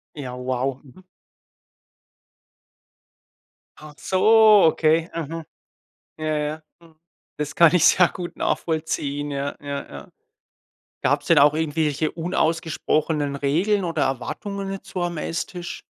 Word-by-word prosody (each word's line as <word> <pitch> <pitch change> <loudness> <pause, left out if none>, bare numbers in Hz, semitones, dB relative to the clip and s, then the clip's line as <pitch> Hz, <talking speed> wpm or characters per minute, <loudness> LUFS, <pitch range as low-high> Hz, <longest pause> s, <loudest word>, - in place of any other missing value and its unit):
Ja, 135 -4 -6
wow, 130 +1 -2
mhm. 145 +8 -17 2.7
Ach 150 -1 -12
so, 215 +2 +5
okay, 160 +1 +2
mhm. 165 0 -5 0.7
Ja, 155 -1 -1
ja. 150 +1 -3 0.2
Mhm. 165 -2 -21 0.4
Das 150 -1 -4
kann 170 -2 +6
ich 165 - +4
sehr 180 -1 +5
gut 175 -1 -8
nachvollziehen. 145 -3 -2
Ja, 140 0 -3
ja, 140 -1 -5
ja. 70 0 -10 0.9
Gab's - - +1
denn - - +4
auch 145 +1 +6
irgendwelche 155 -1 -1
unausgesprochenen 160 -3 -1
Regeln 180 +9 +1
oder 165 -1 -1
Erwartungen 195 - -4
jetzt 195 - -8
so 185 - -4
am 175 -1 -3
Esstisch? 170 +2 -5
155 Hz, 115 wpm, -23 LUFS, 145-175 Hz, 2.7 s, kann